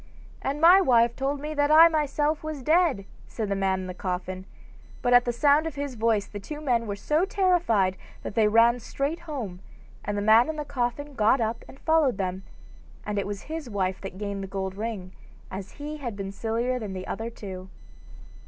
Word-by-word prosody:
'And 280 +2 -2
my 350 +4 +8
wife 235 -7 +4
told 275 +1 -2
me 300 +2 -5
that 290 -1 +1
I 320 +2 +9
myself 300 -1 0
was 310 -4 -5
dead,' 310 - +2 0.2
said 220 -3 -4
the 200 - 0
man 190 -1 0
in - - -6
the 180 - -5
coffin. 185 0 -4 0.6
But 245 0 +3
at 245 0 +6
the 240 - +1
sound 290 +5 +3
of 315 - -6
his 285 -1 -4
voice 225 -3 +1
the 205 - -8
two 295 +9 -7
men 240 -6 0
were 200 - -3
so 300 - 0
terrified 350 - +2 0.3
that - - -5
they 220 -1 +3
ran 230 +3 +4
straight 280 +7 -3
home, 255 - -6 0.4
and 205 0 -3
the 205 - -1
man 220 +6 +6
in 315 - -2
the 300 -1 -4
coffin 275 +3 -3
got 225 +2 +3
up 225 0 -2
and 270 - -14
followed 315 -8 +2
them, 185 -1 -2 0.6
and 210 -1 -1
it 200 - -3
was 205 0 -5
his 315 -4 -6
wife 190 -3 -2
that 195 -1 -7
gained 200 -1 -4
the - - -5
gold 190 0 -4
ring, 205 -3 -5 0.4
as 190 0 -7
he 300 +1 -6
had 240 -7 -5
been 195 -1 -5
sillier 230 +5 -1
than 210 -4 -5
the 185 0 -6
other 225 +3 -4
two. 190 -4 -9
235 Hz, 210 wpm, -26 LUFS, 200-295 Hz, 0.6 s, I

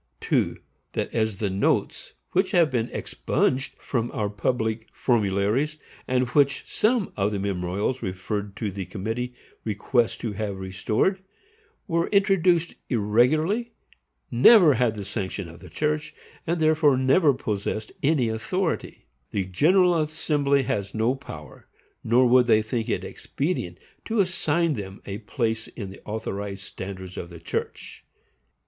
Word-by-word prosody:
2. - - +1 0.4
That - - -2
as 110 -3 0
the 100 -2 -1
notes 95 +1 0 0.2
which 185 +1 +2
have 170 -4 +4
been 120 -2 0
expunged 130 +1 -1
from 120 -3 -2
our 105 -2 0
public 110 +1 -1
formularies, 110 +6 +1 0.3
and 125 0 +1
which 140 +1 +3
some 220 -2 +1
of 100 +1 +1
the 105 - -1
memorials 100 +5 -1
referred 100 +1 -4
to 105 -4 -3
the 95 -1 -5
committee 115 +5 -4 0.3
request 115 +3 0
to 115 - -2
have 100 -1 -3
restored, 105 - 0 0.7
were 170 -2 +1
introduced 185 -4 +3 0.2
irregularly, 155 - +2 0.6
never 160 - +7
had 120 -2 +1
the 100 -2 -6
sanction 100 -2 -4
of 85 0 -12
the 90 - -12
church, 150 - -2 0.3
and 170 +1 0
therefore 155 -3 +4
never 135 +4 +4
possessed 110 -3 -3
any 140 -4 +2
authority, 160 - -2 0.2
the 100 -2 -1
General 170 - +4
Assembly 145 -2 +1
has 100 -4 -2
no 110 +3 +2
power, 135 0 -10 0.4
nor 120 +3 +4
would 125 0 +5
they 110 -2 +5
think 115 +1 -2
it - - -1
expedient, 135 - -3 0.3
to 225 -1 -1
assign 170 -3 +2
them 100 -5 -6
a 100 +1 -5
place 110 -1 -2
in 100 -4 -7
the 95 - -12
authorized 100 -2 -4
standards 95 -2 -7
of 85 - -5
the 85 -1 -10
church. 80 - -5
120 Hz, 140 wpm, -25 LUFS, 100-150 Hz, 0.7 s, never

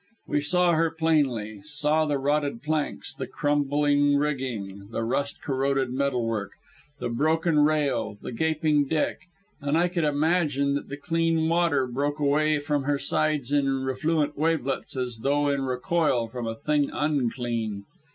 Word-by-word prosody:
We 145 - +1
saw 180 +4 +3
her 165 +1 +2
plainly 140 -11 0
saw 150 +1 +1
the 145 -1 +1
rotted 145 -2 -1
planks, 155 -1 -2
the - - -5
crumbling 145 0 +2
rigging, 120 -9 -3
the 115 - -3
rust 140 +4 -2
corroded 135 -1 0
metal 130 -3 0
work, 105 -3 -3 0.5
the - - -2
broken 160 +5 +2
rail, 145 -8 +1
the - - -7
gaping 155 +2 +1
deck, 155 +1 0 0.4
and 145 +2 +1
I 175 +1 +3
could 175 -2 -1
imagine 145 -2 +1
that 140 - -3
the 140 - -5
clean 165 +1 +1
water 165 -5 +2
broke 140 +4 -2
away 150 +1 +2
from 145 -1 -1
her 145 0 +1
sides 145 -1 0
in 135 -2 +1
refluent 150 +3 0
wavelets 150 -4 -1
as 125 -3 -3
though 145 +4 +1
in 140 -1 0
recoil 130 -1 +1
from 120 0 -5
a 115 - -3
thing 145 +2 0
unclean. 120 -7 -1
145 Hz, 150 wpm, -26 LUFS, 130-155 Hz, 0.5 s, saw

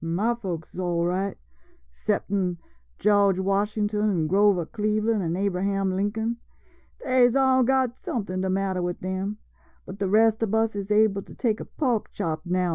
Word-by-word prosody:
White - - -4
Ma 205 +8 +1
folks 180 -9 -6
is - - -8
all 175 -2 0
right 185 +3 -1 0.3
— - - -36
'ceptin' 195 - -1 0.4
George 200 -2 +3
Washington 210 +2 0
an' 170 -6 0
Grover 195 0 +3
Cleveland 215 +2 0
an' 170 0 -2
Abra 190 -2 -1
ham 195 -1 0
Lincoln 220 +4 -1 0.3
— - - -23
dey 255 -1 +4
's 240 - -4
all 265 -1 +4
got 260 -1 +2
somethin' 190 -8 -4
de 190 - -1
matter 190 -1 0
wid 175 0 -3
dem, 190 +3 -3 0.5
but 190 +1 -9
de 200 - 0
res' 220 +2 +3
ob 220 -1 0
us 220 -1 +1
is 200 0 -4
able 210 -1 +3
to - - -14
take 225 -4 0
a - - -6
pork 245 -8 -1
chop 155 -2 -2
now 180 +1 +1
an' - - +2
den 180 - 0
200 Hz, 200 wpm, -25 LUFS, 185-220 Hz, 0.5 s, dey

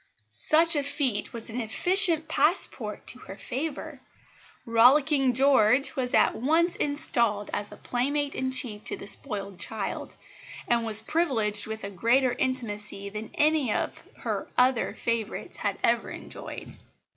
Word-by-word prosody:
Such 320 - +3
a 290 - +2
feat 280 -6 -2
was 230 -1 -8
an 245 +2 -3
efficient 335 - +3
passport 250 - +1
to 250 - -2
her 195 - -10
favour. 280 +7 -5 0.6
Rollicking 265 +3 +4
George 265 +1 +3
was 250 -3 -1
at - - +3
once 325 +8 +1
installed 235 -8 0
as 205 0 -3
playmate 285 +3 -1
in 260 0 -2
chief 225 -5 -2
to - - -4
the - - -10
spoiled 200 -6 -2
child, 220 -3 -3 0.5
and 235 -1 +2
was 220 -1 -2
privileged 220 -8 +1
with 220 0 -6
a 200 - -5
greater 240 +7 +2
intimacy 210 -7 -3
than 210 +1 -7
any 300 -5 +2
of - - -3 0.2
her - - -3
other 250 -1 +2
favourites 230 -2 -3
had - - -2
ever - - +1
enjoyed. - - -9
250 Hz, 140 wpm, -26 LUFS, 215-285 Hz, 0.6 s, Rollicking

